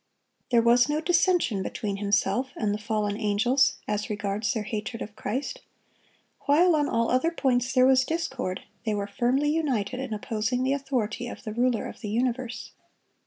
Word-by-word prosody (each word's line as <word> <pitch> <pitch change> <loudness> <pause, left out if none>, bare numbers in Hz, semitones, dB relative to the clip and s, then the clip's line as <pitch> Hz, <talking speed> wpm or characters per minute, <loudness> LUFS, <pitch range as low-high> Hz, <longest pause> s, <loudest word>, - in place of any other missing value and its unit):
There 235 -2 +4
was 240 +3 +5
no 300 +1 +1
dissension 345 - +2
between 200 +1 -3
himself 205 +5 0
and 210 -2 0
the 210 - -3
fallen 210 -1 -1
angels 235 +6 +2
as 210 0 -2
regards 210 +1 -1
their 225 -5 -2
hatred 215 +2 -4
of 210 - -10
Christ; 250 +7 -4 0.9
while 330 +4 +5
on 295 -1 +1
all 230 0 +1
other 255 +6 +3
points 255 -6 0
there 255 -1 +5
was 260 0 +5
discord, 265 - -3 0.2
they 215 -3 0
were 200 -1 -2
firmly 260 +7 +1
united 260 -7 -1
in 265 -3 -5
opposing 220 +3 -1
the 265 +1 +2
authority 250 -4 -2
of - - -8
the 215 - -5
Ruler 240 0 +1
of - - -8
the 210 - -4
universe. 240 +1 -2
240 Hz, 170 wpm, -26 LUFS, 210-265 Hz, 0.9 s, was